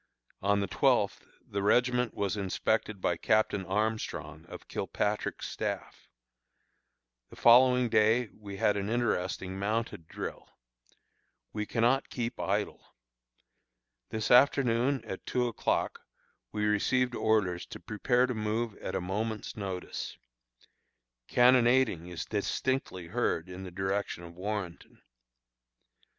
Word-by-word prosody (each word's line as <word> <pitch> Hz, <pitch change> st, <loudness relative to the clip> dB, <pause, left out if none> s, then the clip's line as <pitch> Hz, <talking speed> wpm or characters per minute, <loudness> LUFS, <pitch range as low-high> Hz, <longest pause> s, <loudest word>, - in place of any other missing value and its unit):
On 100 Hz, +1 st, +2 dB
the -, -, 0 dB
twelfth -, -, +1 dB, 0.2 s
the 100 Hz, -, -3 dB
regiment 125 Hz, +3 st, +2 dB
was 100 Hz, 0 st, -1 dB
inspected 105 Hz, +1 st, -1 dB
by 85 Hz, -, +1 dB
Captain 110 Hz, -2 st, +2 dB
Armstrong, 105 Hz, -6 st, -2 dB
of -, -, -10 dB
Kilpatrick's 105 Hz, 0 st, -2 dB
staff. -, -, -5 dB, 1.2 s
The -, -, -13 dB
following 125 Hz, +1 st, +6 dB
day 110 Hz, +1 st, +3 dB
we 100 Hz, -2 st, -9 dB
had 105 Hz, +1 st, +2 dB
an 100 Hz, +1 st, -2 dB
interesting 95 Hz, -5 st, -1 dB
mounted 105 Hz, -5 st, -2 dB
drill. -, -, -7 dB, 1.0 s
We 105 Hz, -1 st, -3 dB
cannot 120 Hz, +3 st, +2 dB
keep 120 Hz, -1 st, -4 dB
idle. -, -, -1 dB, 1.3 s
This 110 Hz, -1 st, -2 dB
afternoon, 125 Hz, 0 st, +4 dB
at 95 Hz, -, -6 dB
two 125 Hz, -1 st, +1 dB
o'clock, 115 Hz, -, -1 dB, 0.5 s
we 105 Hz, -1 st, -1 dB
received 125 Hz, +4 st, +2 dB
orders 105 Hz, -7 st, +1 dB
to -, -, -9 dB
prepare 120 Hz, +4 st, +1 dB
to 130 Hz, -, -2 dB
move 110 Hz, 0 st, -2 dB
at -, -, -5 dB
a -, -, 0 dB
moment's 105 Hz, +4 st, -3 dB
notice. 95 Hz, -3 st, -5 dB, 1.1 s
Cannonading 125 Hz, -7 st, +4 dB
is 90 Hz, -2 st, -5 dB
distinctly 105 Hz, -2 st, -2 dB
heard 90 Hz, -3 st, -1 dB
in 90 Hz, +1 st, -8 dB
the -, -, -6 dB
direction 95 Hz, 0 st, -2 dB
of 85 Hz, 0 st, -10 dB
Warrenton. 95 Hz, -1 st, -5 dB
105 Hz, 115 wpm, -30 LUFS, 95-120 Hz, 1.3 s, following